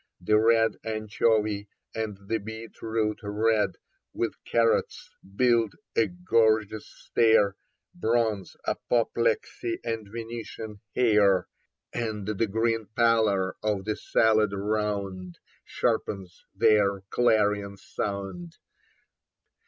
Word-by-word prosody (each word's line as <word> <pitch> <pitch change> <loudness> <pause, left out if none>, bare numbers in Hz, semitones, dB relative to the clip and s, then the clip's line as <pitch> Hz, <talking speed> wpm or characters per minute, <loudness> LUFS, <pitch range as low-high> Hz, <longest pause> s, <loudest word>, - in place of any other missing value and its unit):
The 105 +4 +3
red 115 0 +3
anchovy 110 -1 0 0.3
and 110 -3 -3
the 115 +1 0
beetroot 110 0 -3
red, 105 +1 +1 0.4
With - - -1
carrots, 115 -1 +1 0.2
build 115 -3 +3 0.2
a 115 - +3
gorgeous 110 - +1
stair 110 -4 +2 0.2
— - - -59
Bronze, 110 -4 0
apoplexy 355 - 0
and 115 -2 -3
Venetian 115 -2 -7
hair 105 -6 +4 0.2
— - - -57
And 110 -4 -3
the 110 +1 0
green 115 +1 0
pallor 110 -5 +2
of 105 -3 -1
the 105 0 -1
salad 110 -2 +2
round 100 -3 -2 0.3
Sharpens 95 -3 -2
their 100 -2 +3
clarion 105 -4 +2
sound. 95 -4 -5
110 Hz, 100 wpm, -27 LUFS, 100-115 Hz, 0.4 s, hair